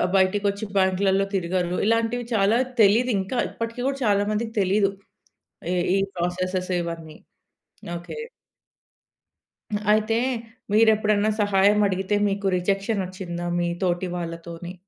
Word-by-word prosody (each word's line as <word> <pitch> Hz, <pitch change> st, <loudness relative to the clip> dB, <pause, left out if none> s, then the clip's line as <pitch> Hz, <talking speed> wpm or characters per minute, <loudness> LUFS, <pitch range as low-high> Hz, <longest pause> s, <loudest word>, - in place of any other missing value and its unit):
బయటికొచ్చి 200 Hz, +2 st, +1 dB
బ్యాంక్‌లల్లో 190 Hz, +1 st, +2 dB
తిరగరు. 180 Hz, -1 st, -1 dB
ఇలాంటివి 230 Hz, +2 st, +1 dB
చాలా 215 Hz, +2 st, +3 dB, 0.2 s
తెలీదింకా. 215 Hz, +1 st, +3 dB
ఇప్పటికి 230 Hz, +1 st, -5 dB
కూడా 275 Hz, 0 st, -1 dB
చాలా 205 Hz, -1 st, +3 dB
మందికి 225 Hz, +1 st, -2 dB
తెలీదు. 195 Hz, +1 st, +2 dB, 0.8 s
ఈ -, -, 0 dB, 0.2 s
ఈ -, -, +3 dB, 0.2 s
ప్రాసెసెస్ 185 Hz, +1 st, -2 dB
ఇవన్నీ. 165 Hz, -2 st, -6 dB, 0.8 s
ఓకె. 175 Hz, -, -8 dB, 1.7 s
అయితే 220 Hz, +1 st, +2 dB, 0.5 s
మీరెప్పుడన్నా 215 Hz, -1 st, +4 dB
సహాయం 205 Hz, 0 st, +4 dB
అడిగితే 190 Hz, +1 st, -1 dB
మీకు 200 Hz, 0 st, -1 dB
రిజెక్షనొచ్చిందా 185 Hz, -2 st, -2 dB
మీ 175 Hz, 0 st, 0 dB
తోటి 180 Hz, 0 st, 0 dB
వాళ్ళతోని? 170 Hz, 0 st, -6 dB
195 Hz, 100 wpm, -24 LUFS, 180-215 Hz, 1.7 s, మీరెప్పుడన్నా